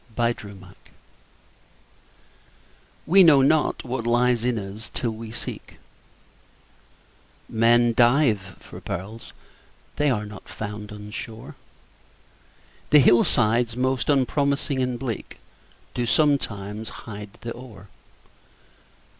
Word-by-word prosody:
HIDDEN 110 -5 -2
GEMS 95 -1 -15 2.3
We 190 +4 +6
know 150 -6 +7
not 155 +2 +2
what 120 -2 -4
lies 120 0 +2
in 125 -1 0
us, 105 +2 -7
till 120 - -1
we 110 0 -8
seek; - - -7 1.7
Men 120 +1 +3
dive 120 -6 +3
for - - -12
pearls—they 100 - -6
are 105 -5 -1
not 105 0 -11
found 105 0 -7
on 105 0 -9
shore, 110 +1 -8 1.4
The 150 - +7
hillsides 120 -2 +3
most 130 +1 0
unpromising 140 0 +1
and 125 -1 -1
bleak 120 -5 -5 0.6
Do 120 -1 -2
sometimes 110 -7 0 0.2
hide 105 -2 -9
the 115 - -5
ore. 115 -6 -11
115 Hz, 100 wpm, -24 LUFS, 105-130 Hz, 2.3 s, know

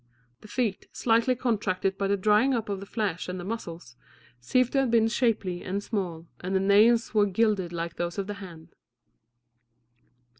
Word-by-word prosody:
The - - -14
feet, 220 -3 -2
slightly 230 +2 +2
contracted 205 -6 -1
by 195 0 -1
the 200 +1 +1
drying 215 +7 +3
up 220 -3 -3
of 200 -1 -2
the 200 - -9
flesh 195 -6 -2
and 180 0 -4
the - - -6
muscles, 175 - -6 0.4
seemed 255 - +1
to 275 - +2
have 270 -2 +1
been 225 -1 +4
shapely 220 -6 0
and 200 +2 -3
small, 180 -7 -3
and 185 +2 -3
the - - +4
nails 215 +4 +4
were 210 -1 +4
gilded 200 -3 +1
like 170 -1 -4
those 175 +1 -3
of 200 - -2
the 205 - -4
hand. 165 -3 -11
200 Hz, 180 wpm, -27 LUFS, 180-225 Hz, 0.4 s, been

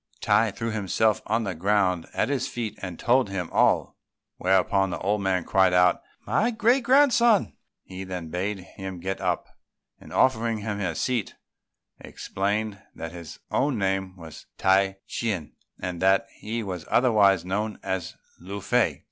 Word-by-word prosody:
Tai 110 +2 +3
threw 115 +3 -4
himself 110 0 +1
on 115 +2 +1
the 100 - -3
ground 90 -1 +1
at - - +1
his 140 -1 -1
feet, 115 -3 -4
and 90 -3 -6
told 125 -2 +2
him 90 -3 -4
all; - - +2 0.4
whereupon 95 +1 +2
the 85 - -3
old 105 +1 0
man 95 -2 0
cried 95 0 +3
out, 90 0 +4 0.2
"My 225 - +2
great 235 +3 +2
grandson!" 240 -4 +4 0.3
He 95 0 -8
then 90 -3 -6
bade 95 +5 -2
him 95 0 -8
get 95 +2 -4
up; 90 -2 -1 0.5
and - - -14
offering 115 -3 +2
him 105 -1 -4
a 90 -5 -2
seat, 120 0 -1 0.6
explained 100 +1 -3
that 80 0 -6
his 85 -2 -9
own 135 -2 +1
name 95 -1 -1
was 80 -3 -11
Tai 95 0 +3
Ch'ien, 100 -10 -3 0.3
and 90 -2 -5
that 95 +4 +4
he 115 +2 -3
was 90 -5 -6
otherwise 100 -7 +4
known 105 +3 -2
as 95 -3 -3 0.2
Lung 100 +3 -7
fei. 100 - +1
100 Hz, 155 wpm, -25 LUFS, 90-110 Hz, 0.6 s, out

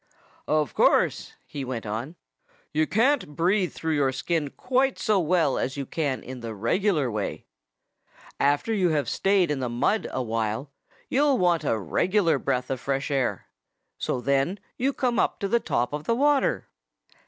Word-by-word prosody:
"Of 155 -1 +1
course," - - +2
he 140 - -6
went 125 -3 -4
on, 115 +10 -4 0.6
"you 155 +1 +2
can't 230 - +1
breathe 180 +3 +2
through 160 -1 -2
your 140 -3 +2
skin 150 +3 -1
quite 260 - 0
so 215 -3 +2
well 165 -5 +2
as 135 +2 -2
you 140 - -3
can 140 -3 -2
in 130 0 -8
the 115 -2 -6
regular 145 - +1
way. 105 -2 -4 0.9
After 145 +10 +2
you 185 -5 +2
have 150 -3 0
stayed 195 -4 +2
in 145 - -1
the 125 -2 -2
mud 125 - 0
a 130 - -2
while, 115 +4 -2 0.4
you'll 285 +2 +3
begin - - 0
to - - +1
want 175 -3 +3
a 115 - +1
regular 165 - +1
breath 130 -1 -1
of 130 - -2
fresh 135 +3 -2
air. 135 -3 0 0.5
So 125 - -2
then 140 +9 +1 0.2
you 265 +3 +1
come 245 -5 0
up - - +1
to 200 - 0
the 235 +4 +2
top 120 - -1
of 150 0 -4
the 230 - +1
water." 285 +1 +2
150 Hz, 175 wpm, -26 LUFS, 130-195 Hz, 0.9 s, you'll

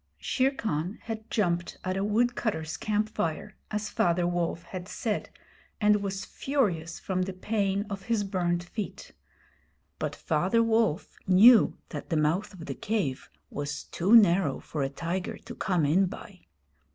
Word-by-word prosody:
Shere 260 0 +1
Khan 195 - -3
had 220 -1 -6
jumped 175 -6 0
at 185 0 -1
a 195 - 0
woodcutters' 210 -6 0
camp 215 0 0
fire, 160 -7 -3
as 210 0 -2
Father 175 0 +2
Wolf 175 -1 -1
had 185 -1 -7
said, 210 0 -2 0.5
and 210 -1 +4
was 195 -1 -3
furious 185 - -1
from 185 -1 -2
the 190 +1 -2
pain 200 +1 -1
of 200 -2 -6
his 230 -3 +1
burned 175 -3 0
feet. 200 +4 -6 0.9
But - - -2
Father 230 -1 +1
Wolf 225 -6 +1
knew 215 +5 +7
that - - -7
the 165 - +1
mouth 165 +7 +1
of 180 -5 -10
the - - -4
cave 195 -12 -2 0.2
was 145 +1 -4
too 195 +7 +3
narrow 185 - +5
for 150 - -5
a 135 - 0
tiger 170 +7 -3
to 240 - -10
come 180 -8 0
in 180 +7 +3
by. 185 0 -11
195 Hz, 155 wpm, -28 LUFS, 170-215 Hz, 0.9 s, knew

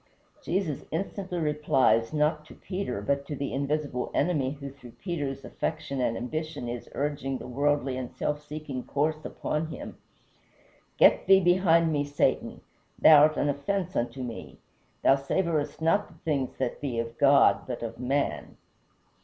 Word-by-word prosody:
Jesus 170 -5 -2
instantly 185 +1 -3
replies, 150 -7 +2
not 150 0 +1
to - - -13
Peter, 180 - -4
but 140 +5 0
to 145 - -4
the 140 0 -4
Invisible 140 -2 -2
Enemy 145 -4 +1
who 140 -1 -8
through 125 -4 -14
Peter's 145 -7 -4
affection 155 -4 -3
and 115 -2 0
ambition 155 +1 -4
is 120 0 -6
urging 140 -2 -2
the - - -9
worldly 140 0 0
and 125 -2 -4
self 150 0 -2
seeking 150 -3 -6
course 155 +2 -1
upon 155 +1 -3
him: 160 - -8 1.0
"Get - - +5
thee 195 0 +8
behind 175 -3 +4
me, 145 -1 +1
Satan, 145 0 0 0.4
thou 155 -2 +8
art 155 +1 +4
an - - +1
offence 175 +6 -2
unto 120 +2 -2
me. 120 -2 -7 0.5
Thou 135 - +6
savorest 155 +2 -1
not 165 +6 +2
the - - -18
things 140 -5 -1
that - - -3
be 135 -5 -3
of 115 0 -4
God 140 0 +5
but 125 -2 -4
of 115 -1 -6
man." 140 +3 -2
145 Hz, 155 wpm, -28 LUFS, 130-155 Hz, 1.0 s, thee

